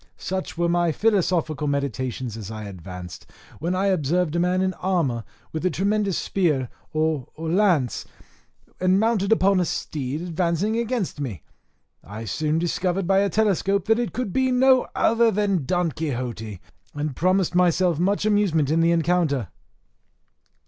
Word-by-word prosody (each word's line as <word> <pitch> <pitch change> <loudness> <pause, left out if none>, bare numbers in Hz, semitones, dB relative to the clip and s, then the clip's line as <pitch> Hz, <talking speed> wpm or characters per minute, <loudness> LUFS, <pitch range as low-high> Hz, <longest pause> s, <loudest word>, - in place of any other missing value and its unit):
Such 185 -2 -4
were 170 0 +1
my 175 -1 +2
philosophical 170 -6 +1
meditations 130 -4 -2
as 110 -3 -7
I 110 -1 -6
advanced, 90 -2 -9 0.3
when 175 +3 -1
I 190 +2 0
observed 175 -2 +1
a - - +1
man 180 +2 +2
in 185 0 0
armour 165 -13 -1 0.3
with 160 - -4
a 185 - +3
tremendous 200 +2 0
spear 150 -10 0 0.2
or 155 -4 0
lance, 165 - +1 0.8
and 185 +1 +3
mounted 220 -3 +1
upon 195 -3 +4
a - - +3
steed, 145 0 -3
advancing 175 +4 0
against 230 -8 -2
me. 110 - -5 0.6
I 105 +4 -8
soon 155 +7 -1
discovered 180 +2 -1
by 195 +2 +3
a 200 0 +2
telescope 200 -1 +1
that 225 +1 +3
it 240 - -1
could 235 -6 -3
be 260 0 +2
no 255 0 +4
other 230 0 +3
than 200 -7 0
Don 175 +1 0
Quixote, 120 - -4 0.4
and 145 -2 -3
promised 185 +1 +1
myself 175 -2 +3
much 200 +4 +1
amusement 190 -9 +2
in 165 +1 +3
the 165 - +4
rencounter. 165 - +1
175 Hz, 150 wpm, -24 LUFS, 145-195 Hz, 0.8 s, upon